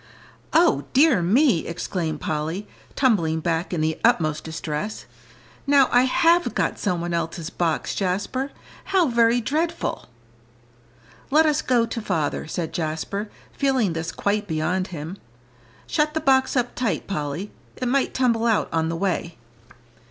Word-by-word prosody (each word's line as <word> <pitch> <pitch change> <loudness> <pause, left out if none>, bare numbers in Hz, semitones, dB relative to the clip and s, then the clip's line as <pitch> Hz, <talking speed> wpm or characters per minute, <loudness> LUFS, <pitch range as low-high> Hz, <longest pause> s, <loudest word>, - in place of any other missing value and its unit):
"O 340 +1 +3
dear 270 - +5
me!" 210 - +3
exclaimed 165 -2 -3
Polly, 160 +6 -3 0.3
tumbling 170 - +2
back 165 +2 -1
in 170 -4 -1
the 155 0 -1
utmost 155 -10 +2
distress, 160 +5 -4 0.6
"now 280 -2 +5
I 245 +1 +5
have 335 +6 +3
got - - 0
some 180 -5 -1
one 175 0 -3
else's 165 -1 -3
box, 165 -3 -1
Jasper. 200 +8 -1 0.4
How 370 -6 +2
very 235 0 +3
dreadful!" 325 +8 -2 1.2
"Let 310 +3 +5
us 305 -1 +2
go 240 -2 +2
to 230 0 -5
father," 165 -9 -2
said 160 0 -4
Jasper, 170 +6 -3 0.2
feeling 260 - +1
this 165 0 -3
quite 205 +1 -1
beyond 170 +3 -1
him. 170 +2 -7 0.7
"Shut 300 0 0
the - - +2
box 265 -2 +3
up 245 -1 0
tight, 225 -10 -1
Polly; 165 +1 -4 0.2
it 255 - -3
might 270 +2 +1
tumble 235 -3 +2
out 225 -2 +2
on 160 0 +1
the 165 - -2
way." 175 -2 -2
200 Hz, 145 wpm, -23 LUFS, 165-255 Hz, 1.2 s, dear